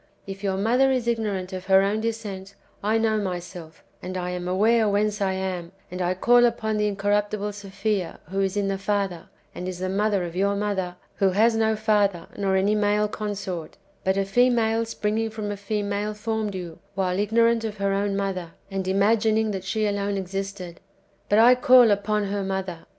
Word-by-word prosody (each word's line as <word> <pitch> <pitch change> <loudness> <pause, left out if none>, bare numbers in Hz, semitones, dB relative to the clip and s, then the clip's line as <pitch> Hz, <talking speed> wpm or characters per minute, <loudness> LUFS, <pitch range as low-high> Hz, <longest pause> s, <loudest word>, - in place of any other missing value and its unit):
If 195 +1 -8
your 190 -1 0
mother 245 +7 +3
is 255 -3 0
ignorant 205 -5 -1
of 185 0 -6
her 190 0 +6
own 205 +2 0
descent, 205 -4 -5 0.3
I 215 +2 +2
know 220 -1 +1
myself, 175 -4 -6 0.2
and 185 0 -5
am 180 0 -3
aware 215 +4 +3
whence 205 +1 0
I 190 -1 +1
am, 185 -2 -4 0.2
and 180 0 -4
I 180 +1 0
call 240 +5 +5
upon 220 -2 -2
the 210 0 +1
incorruptible 205 +1 0
Sophia, 200 -2 -3
who 195 0 0
is 195 +1 -1
in 200 -1 +1
the 195 -1 -2
Father, 195 -4 -2 0.2
and 180 - -6
is 185 -1 -4
the 185 +1 -3
mother 200 0 +1
of 170 -1 -6
your 200 +2 +1
mother, 195 -3 -2 0.2
who 195 - +3
has 220 +5 +3
no 220 0 +2
father, 205 -5 +1
nor 195 -2 0
any 195 +2 +2
male 210 0 +2
consort; 195 -6 -5 0.3
but 190 +1 +1
a 195 - +1
female 230 +1 +2
springing 225 0 -1
from 215 -1 -4
a - - -3
female 205 +1 -2
formed 215 -1 -2
you, 175 -3 -7 0.2
while 185 -1 0
ignorant 230 +2 +3
of 215 -1 -4
her 200 0 0
own 200 0 0
mother, 185 -4 -3 0.2
and 190 -1 -3
imagining 215 +3 +2
that 190 -2 -4
she 215 +2 0
alone 200 -1 -1
existed; 195 -2 -5 0.5
but 205 - +4
I 235 +3 +8
call 250 -2 +6
upon 205 +1 +1
her 200 0 -2
mother." 190 -3 -4
200 Hz, 190 wpm, -24 LUFS, 190-215 Hz, 0.5 s, I